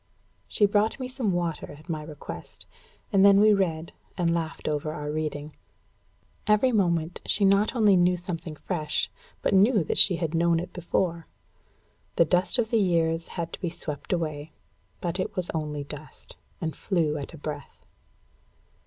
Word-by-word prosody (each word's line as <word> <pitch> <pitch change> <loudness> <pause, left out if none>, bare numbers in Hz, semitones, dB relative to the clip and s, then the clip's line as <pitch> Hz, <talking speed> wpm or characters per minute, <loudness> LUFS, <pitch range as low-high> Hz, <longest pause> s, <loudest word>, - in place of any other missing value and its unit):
She 210 - +3
brought 205 +4 +1
me 255 - -3
some 250 -5 -1
water, 170 -4 -2
at 155 - -17
my 160 -3 -3
request; 150 - -9 0.5
and 195 -1 +5
then 200 0 +7
we 215 +1 +6
read, 170 -5 -1 0.2
and 170 -2 +2
laughed 165 -1 -3
over 155 0 -1
our 150 -1 -4
reading. 150 -1 -4 0.9
Every 215 +5 +4
moment 175 -6 +1
she 200 - +2
not 200 +5 +3
only 210 -4 +5
knew 180 0 +4
something 170 -3 -5
fresh, 155 -2 -2 0.3
but - - +2
knew 200 +1 +5
that - - 0
she 185 - +7
had 165 -2 -2
known 170 0 +3
it 175 - -6
before. 170 -1 -1 0.9
The 170 - +5
dust 180 +8 +1
of 225 -2 0
the 230 - +4
years 165 -3 +1
had 170 -1 -3
to - - -7
be 175 - -1
swept 150 -3 -6
away; 155 -3 -2 0.5
but 175 +1 -2
it - - -2
was 180 -2 -2
only 150 -2 -3
dust, 150 +1 -10 0.2
and 160 -2 -3
flew 160 -6 0
at 145 +4 -7
a - - -11
breath. 145 -1 -7
170 Hz, 170 wpm, -27 LUFS, 155-195 Hz, 0.9 s, then